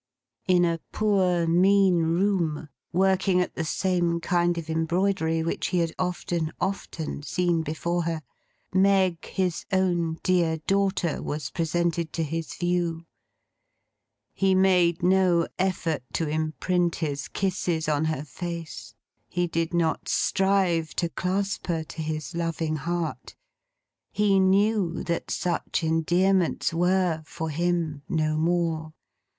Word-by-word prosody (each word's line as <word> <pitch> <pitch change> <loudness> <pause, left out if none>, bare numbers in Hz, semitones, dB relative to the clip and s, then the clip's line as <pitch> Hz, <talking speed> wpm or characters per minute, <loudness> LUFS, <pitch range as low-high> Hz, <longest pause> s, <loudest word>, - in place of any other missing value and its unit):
In 180 -1 +4
a 165 -1 0
poor, 185 -5 +2
mean 185 +2 +4
room; 165 -2 0 0.2
working 190 0 +2
at 180 - -1
the 160 - -3
same 175 0 0
kind 175 0 +1
of 165 -2 -5
embroidery 165 0 0
which 165 - -2
he 180 - -1
had 165 -2 0
often, 175 -3 -2
often 170 -6 -3
seen 175 +2 0
before 165 +2 -2
her; 165 -2 -2 0.5
Meg, 190 -2 +3
his 180 -3 -2
own 175 -4 +1
dear 170 -3 +2
daughter, 195 -4 +1
was 145 -2 -4
presented 170 0 -1
to 165 - -1
his 160 +1 -4
view. 175 -2 -1 1.3
He 195 -1 +2
made 180 -3 +3
no 180 -2 +3
effort 180 -4 0
to 165 - -1
imprint 160 +3 0
his 145 -4 -3
kisses 175 -4 -1
on 155 0 +1
her 155 -3 -1
face; 165 - -7 0.3
he 175 0 0
did 165 -1 -1
not 170 -2 0
strive 190 -5 +1
to 170 - 0
clasp 190 +5 -2
her 165 -2 -1
to 160 +1 -8
his 155 -1 -4
loving 165 -2 -2
heart; 170 +2 -4 0.8
he 205 -2 +3
knew 190 -1 +2
that 170 -1 -3
such 175 -2 -1
endearments 175 +3 +2
were, 175 -1 +2
for 160 -1 -4
him, 165 -2 -1
no 155 -2 +1
more. 160 -1 0
170 Hz, 125 wpm, -26 LUFS, 160-185 Hz, 1.3 s, In